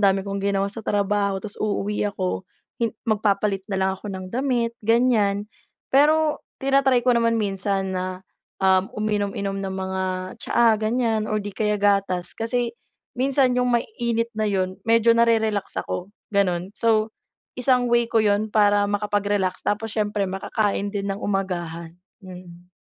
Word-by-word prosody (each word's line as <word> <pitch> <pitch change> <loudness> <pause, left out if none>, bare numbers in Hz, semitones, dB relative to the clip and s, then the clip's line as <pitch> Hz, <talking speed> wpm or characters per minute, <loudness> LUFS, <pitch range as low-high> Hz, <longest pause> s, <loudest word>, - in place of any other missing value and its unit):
dami 195 -1 +3
kong 200 0 -3
ginawa 195 0 +1
sa 225 - -6
trabaho, 200 -1 0
tapos 210 -2 -7
uuwi 210 0 -1
ako 185 -2 -3 0.3
hin 230 - +2 0.2
magpapalit 205 -2 +1
na 195 - -2
lang 190 0 +1
ako 205 - -9
ng 185 -1 -6
damit 245 -2 0
ganyan. 220 -3 +2 0.5
Pero 305 +2 +4 0.2
tina-try 270 -2 +2
ko 250 - +5
naman 230 -1 +2
minsan 195 -2 -1
na, 185 0 -4 0.3
um, 190 0 +3
uminom-inom 200 -2 -1
ng 190 -1 -4
mga 190 0 -2 0.4
tsaa 235 -1 +3
ganyan, 220 -1 0
o 215 - 0
di 205 -1 -4
kaya 210 +1 0
gatas, 195 -3 +1
kasi 235 +1 -1 0.4
minsan 260 0 +2
yung 250 - +1
maiinit 235 - -2
na 215 -1 -1
yun, 185 -1 -1
medyo 230 0 +5
nare-relax 220 -3 +2
ako 180 - -3 0.2
gano'n. 185 -2 0
So, 220 0 +1 0.5
isang 250 -1 +2
way 235 -1 +3
ko 225 -2 +2
yun 205 +1 +2
para 205 -1 +3
makapag-relax, 205 -2 0
tapos 215 +1 -2
siyempre 210 -2 0
makakain 200 +2 -1
din 200 -1 -2
ng 200 - -7
umagahan, 175 -4 -3 0.3
mm. 180 -1 -12
205 Hz, 145 wpm, -23 LUFS, 195-230 Hz, 0.5 s, ko